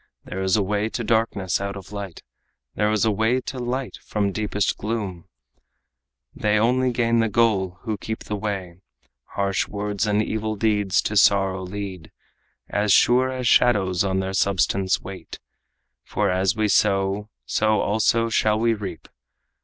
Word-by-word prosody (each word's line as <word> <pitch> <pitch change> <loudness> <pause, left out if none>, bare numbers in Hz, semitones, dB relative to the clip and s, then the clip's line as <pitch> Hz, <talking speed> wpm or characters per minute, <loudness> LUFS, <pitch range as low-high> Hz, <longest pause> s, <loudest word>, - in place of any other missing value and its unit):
"There 95 - -5
is 95 +2 +2
a 105 - +2
way 105 +2 -1
to 120 +1 -4
darkness 110 -5 0
out 100 0 -3
of 95 -1 -10
light, 100 -4 -7 0.5
There 105 0 +1
is 110 0 +2
a 110 - +3
way 110 +5 +1
to 130 0 -6
light 125 +1 -3
from 100 -2 -1
deepest 105 0 -1
gloom. 100 -5 -4 1.1
They 105 0 +1
only 125 +3 +2
gain 115 -1 +1
the 115 -1 +2
goal 100 -5 +1
who 110 -4 -4
keep 110 +2 -5
the 105 - -4
way. 95 -4 -5 0.5
Harsh 100 -1 0
words 105 +1 -2
and 105 +1 +2
evil 110 0 -2
deeds 105 -3 +1
to 105 - -2
sorrow 95 -1 +3
lead 95 -2 -7 0.6
As 105 0 0
sure 125 +5 +5
as 130 -2 -2
shadows 100 -8 +3
on 95 -1 0
their 95 0 -4
substance 95 0 +1
wait. 90 -3 -9 0.7
For 100 -2 -1
as 95 0 +1
we 110 -1 +1
sow, 100 0 +1 0.2
so 110 0 +1
also 110 +2 +2
shall 110 -1 +2
we 115 +1 +2
reap. 105 -3 -7
105 Hz, 160 wpm, -23 LUFS, 95-110 Hz, 1.1 s, sure